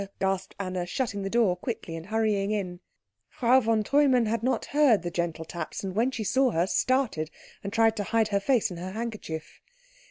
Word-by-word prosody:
gasped 190 -1 -1
Anna, 185 -2 -2
shutting 210 -1 -2
the 195 - -3
door 220 -5 +3
quickly 180 -3 -5
and 165 +2 -8
hurrying 215 -2 +1
in. 190 -4 -2 0.5
Frau 250 +2 +4
von 225 -3 +1
Treumann 270 -1 +3
had 220 0 -1
not 255 +3 0
heard 275 - +4
the 175 - -3
gentle 170 -2 -2
taps, 170 +2 -6
and 190 -1 -3
when 235 +4 +2
she 240 -4 -4
saw 260 +6 +3
her, 170 -5 +1
started, 220 - 0 0.3
and 200 - -4
tried 225 0 +3
to 205 - -1
hide 225 0 +1
her 200 -1 +1
face 230 -1 +1
in 175 - -6
her 185 +2 -6
handkerchief. 215 -8 -6
215 Hz, 195 wpm, -27 LUFS, 185-235 Hz, 0.5 s, Frau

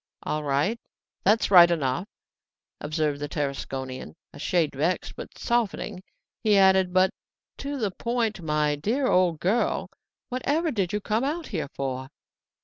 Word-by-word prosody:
"All 155 0 -2
right, 145 +11 +1 0.4
that's 210 +1 +3
all - - +5
right 170 0 +10
enough!" 160 +2 0 0.7
observed 150 -1 -1
the 145 - -3
Tarasconian, 135 - -4 0.2
a - - -11
shade 170 -5 +1
vexed; 160 +7 -1
but - - -9
softening, 215 -5 -1 0.4
he 210 -2 +4
added, 190 -1 +5
"But 185 +1 +4 0.5
to 280 +1 -4
the 215 -6 -1
point, 230 -1 -1
my 150 -2 +1
poor 255 +5 +1
old 180 -4 +3
girl; 210 +9 0 0.4
whatever 290 +6 0
did 195 -8 -1
you 210 - -1
come 215 +4 0
out 310 +4 -2
here 165 -10 -2
for?" 130 -1 -3
185 Hz, 145 wpm, -26 LUFS, 150-225 Hz, 0.7 s, right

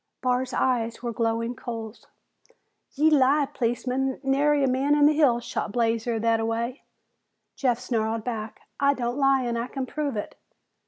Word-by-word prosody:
Barr's 255 +1 0
eyes 240 -2 0
were 235 -1 -2
glowing 230 +1 -1
coals. 225 -3 -7 0.9
"Ye 310 +3 +4
lie, 285 0 +4
policeman! 255 +2 -1
Nary 285 +2 +2
a - - +3
man 270 +3 +2
in 295 -1 +5
the 300 - +5
hills 260 -6 +3
shot 205 - -4
Blazer 230 -1 0
thataway!" 230 +3 0 0.7
Jeff 250 -4 +1
snarled 225 -2 -2
back, 220 -3 -5 0.2
"I 280 0 +3
don't 245 +1 -2
lie 270 -1 +3
and 235 -1 -1
I 235 - -3
can 265 0 -4
prove 285 -3 -3
it!" 205 - -5
250 Hz, 155 wpm, -25 LUFS, 230-270 Hz, 0.9 s, in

